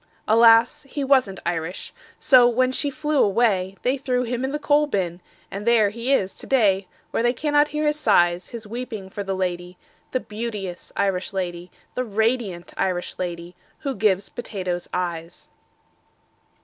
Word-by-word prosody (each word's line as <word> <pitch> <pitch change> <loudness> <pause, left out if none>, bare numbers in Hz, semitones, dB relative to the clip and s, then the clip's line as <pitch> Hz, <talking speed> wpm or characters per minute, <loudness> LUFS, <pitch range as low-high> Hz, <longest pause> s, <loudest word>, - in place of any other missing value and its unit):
Alas, 230 +5 +5
he 285 - -3
wasn't 260 -9 +2
Irish. 170 +1 -3 0.2
So 250 -3 +6
when 255 +2 +2
she 285 +2 -1
flew 300 0 0
away, 195 -3 +2
They 260 +3 +1
threw 250 -2 0
him 245 +1 -3
in 265 - -1
the 295 - -1
coal 295 0 +2
bin 180 - -2 0.3
And 200 +1 -5
there 220 -3 +4
he 235 +4 -3
is 195 -8 +2
to - - -10
day, 200 -7 +3 0.2
Where - - 0
they 240 +1 +2
cannot 295 +2 +2
hear 300 +1 -2
his 300 0 +1
sighs 175 -8 +3
His 230 -2 -8
weeping 220 -4 -6
for 205 - -4
the 195 -1 -2
lady, 180 -1 -3 0.3
The 255 - -1
beauteous 210 -6 -6
Irish 195 -1 0
lady, 175 -2 -4 0.2
The 255 - -1
radiant 220 -5 -1
Irish 180 -2 -2
lady 175 -1 -5 0.3
Who 275 -2 -2
gives 200 -3 +1
potatoes 185 -7 -4
eyes." 170 -2 -4
215 Hz, 160 wpm, -23 LUFS, 185-255 Hz, 0.3 s, So